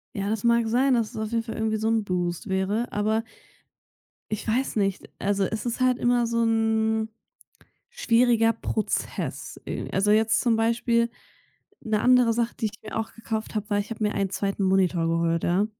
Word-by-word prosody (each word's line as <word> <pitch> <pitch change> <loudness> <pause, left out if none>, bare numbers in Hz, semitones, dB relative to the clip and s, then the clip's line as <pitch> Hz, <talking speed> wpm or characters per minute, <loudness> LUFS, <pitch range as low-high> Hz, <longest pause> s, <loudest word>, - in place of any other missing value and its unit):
Ja, 200 -1 -2
das 215 -1 -2
mag 235 -1 +3
sein, 255 +3 +3
dass 230 -3 0
es - - -10
auf 215 0 -3
jeden 230 -1 0
Fall 225 - -6
irgendwie 220 0 0
so 220 +1 -1
'n 225 -1 +2
Boost 175 0 -2
wäre, 195 +5 0
aber 215 +2 0 1.1
ich 215 +1 -4
weiß 250 +5 0
nicht. 195 -3 -1
Also, 200 0 0
es 220 +4 -3
ist 240 +1 -3
halt 255 -1 +3
immer 240 -1 +2
so 230 0 +1
'n 220 0 +1 0.8
schwieriger 235 - +3
Prozess 220 -1 -3
i - - -4
also, 200 +2 +3
jetzt 220 +1 +3
zum 235 -2 +2
Beispiel 235 +1 +1 0.7
'ne 215 -1 0
andere 250 -1 +5
Sache, 235 +1 -1
die 225 - +1
ich 215 0 -7
mir 215 - -7
auch 220 - -4
gekauft 225 -1 -4
habe, 210 0 -3
war 205 - +2
ich 205 +2 -3
habe 220 -1 -3
mir 210 - 0
einen 195 -1 -1
2. 195 +1 -2
Monitor 185 -3 +2
geholt, 165 0 +1
ja? 185 +4 +2
220 Hz, 190 wpm, -25 LUFS, 205-230 Hz, 1.1 s, andere